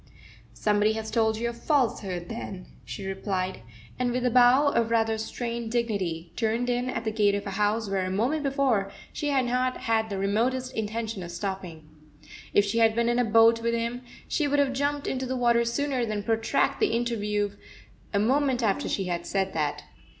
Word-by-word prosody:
"Somebody 210 0 +2
has 220 0 -5
told 220 -1 +2
you 235 +1 -1
a 235 - -3
falsehood, 225 - 0
then," 195 -4 -6 0.2
she 200 - -7
replied, 190 - -2 0.4
and, 250 -1 +1
with 250 +1 -1
a 250 - +2
bow 255 +4 +6
of 230 -4 +1
rather 225 -1 +1
strained 235 0 -4
dignity 190 -8 -2
turned 235 +2 0
in 245 +1 -1
at 245 - -3
the 220 - -1
gate 205 -2 +2
of 200 - -3
a 200 - -4
house 210 +2 0
where 195 -1 0
a 185 - -2
moment 240 +11 0
before 270 -8 +1 0.2
she 295 - -3
had 270 -3 +2
not 255 +1 0
had 220 -2 +1
the 200 - -3
remotest 240 +6 0
intention 220 -1 -3
of 175 - -6
stopping. 175 -3 -5 0.6
If 205 - +4
she 220 +3 0
had 225 -1 +4
been 235 0 +2
in 240 +1 +2
a - - +4
boat 230 0 +5
with 235 0 0
him, 235 +1 -2 0.3
she 300 - 0
would 290 +1 +1
have 280 -2 +2
jumped 285 +1 -1
into 260 0 -2
the 260 +1 -2
water 235 -1 +3
sooner 260 +2 -1
than 215 -3 -2
protract 225 +1 +1
the 425 - +2
inter 240 0 -1
view 205 -1 -1 0.6
a 200 - 0
moment 260 +3 +2
after 200 -3 0
she 195 - -1
had 175 -2 -3
said 190 -1 -1
that. 150 -2 -1
225 Hz, 200 wpm, -27 LUFS, 205-245 Hz, 0.6 s, bow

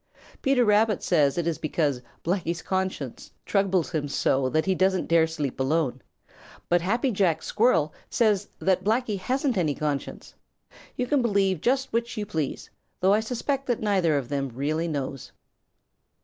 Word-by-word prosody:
Peter 270 -3 +3
Rabbit 210 -1 +3
says 145 -6 +3
that 175 - +1
it 170 - -4
is 160 - -7
because 150 -5 0 0.2
Blacky's 170 -1 -1
conscience 185 -9 -3 0.2
troubles 190 -4 +1
him 155 -4 -1
so 135 -1 +1
that 155 +3 +1
he 190 - +2
doesn't 185 0 +1
dare 165 -1 +4
sleep 150 -6 -4
alone, 135 -2 0 0.7
but 175 0 +3
Happy 230 +8 +1
Jack 190 -6 +1
Squirrel 165 -10 +2 0.2
says 210 -4 +2
that 190 -1 +1
Blacky 220 -1 0
hasn't 255 +4 0
any 155 -5 0
conscience. 145 -2 -4 0.6
You 250 - 0
can 280 +1 +2
believe 195 -7 +1
just 265 +1 0
which 235 0 -1
you 210 - -2
please, 160 -8 -4 0.3
though 190 +2 +4
I 210 - +4
suspect 260 +4 -2
that 245 -3 0
neither 190 -8 +2
of 135 -4 -3
them 140 -1 -1
really 150 +7 -2
knows. 140 -4 -4
185 Hz, 165 wpm, -26 LUFS, 155-215 Hz, 0.7 s, dare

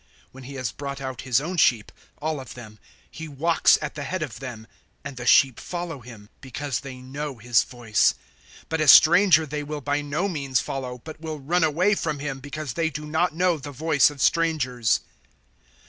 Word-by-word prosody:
010:004 - - -35 0.2
When 130 0 -13
he 140 - -9
has 130 -3 -3
brought 140 -1 -6
out 130 -2 -6
his 130 -2 +2
own 175 +6 -5
sheep 120 -8 +3 0.3
all 155 0 -2
of 130 -6 -10
them 110 -3 -12 0.3
he 160 0 -8
walks 160 +3 +3
at 150 - -4
the 150 - -7
head 175 +3 -3
of 130 -9 -7
them; 120 -5 -8 0.4
and 140 -1 -7
the 120 -1 -6
sheep 135 -5 +5
follow 175 -4 -5
him, 115 -4 -13
because 135 0 -4
they 135 -3 -9
know 140 +1 -6
his 120 0 +2
voice. 120 -4 +1 0.5
010:005 - - -24
But 160 0 -1
a 155 - +1
stranger 170 +3 +7
they 150 0 -4
will 150 0 -6
by 145 +2 -1
no 150 +7 -2
means 140 -8 -1
follow, 125 -2 -5
but 155 0 -10
will 155 -2 -5
run 165 +6 +1
away 170 +7 +2
from 155 -6 -2
him, 140 -1 -5
because 145 0 -6
they 165 -1 0
do 150 0 -7
not 160 +2 0
know 175 -2 +1
the 145 +1 -8
voice 145 0 +3
of 145 -2 -4
strangers." 130 -10 +1
145 Hz, 205 wpm, -24 LUFS, 130-160 Hz, 0.5 s, stranger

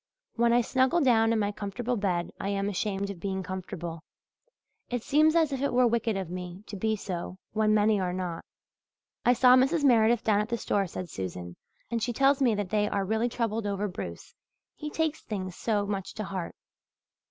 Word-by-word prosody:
When 235 0 +2
I 240 +1 +5
snuggle 260 +7 +2
down 225 -4 +4
in 230 - +2
my 205 -1 0
comfortable 215 +4 -3
bed 185 -5 -1
I 195 - -2
am 200 0 -1
ashamed 200 0 -2
of 190 - -9
being 190 0 -3
comfortable. 175 -3 -6 0.9
It 245 -2 -2
seems 310 +3 +4
as 320 -3 +3
if 265 - -3
it 280 - +1
were 250 0 +4
wicked 230 -2 +1
of 190 -2 -3
me 180 +1 -6
to 210 - -8
be 220 +3 0
so 185 -2 -5
when 215 0 +2
many 210 0 +3
are 180 -1 -1
not." 180 -2 -4 0.8
"I 245 - +6
saw 250 +1 +6
Mrs. 270 +5 +3
Meredith 235 -3 +4
down 210 -2 +3
at 215 - -4
the 235 - 0
store," 200 -3 0
said 180 +1 -6
Susan, 90 - -6 0.4
"and 230 -1 -1
she 240 +2 -1
tells 275 +3 +3
me 240 -5 +4
that 205 -3 -3
they 210 -1 +2
are 195 - -1
really 220 +4 0
troubled 225 -2 -2
over 200 +1 -1
Bruce, 180 - -7 0.4
he 300 - -5
takes 320 0 -1
things 185 -4 -5
so 210 -3 0
much 200 -2 -4
to 215 - -3
heart. 190 -3 -5
210 Hz, 200 wpm, -28 LUFS, 190-240 Hz, 0.9 s, I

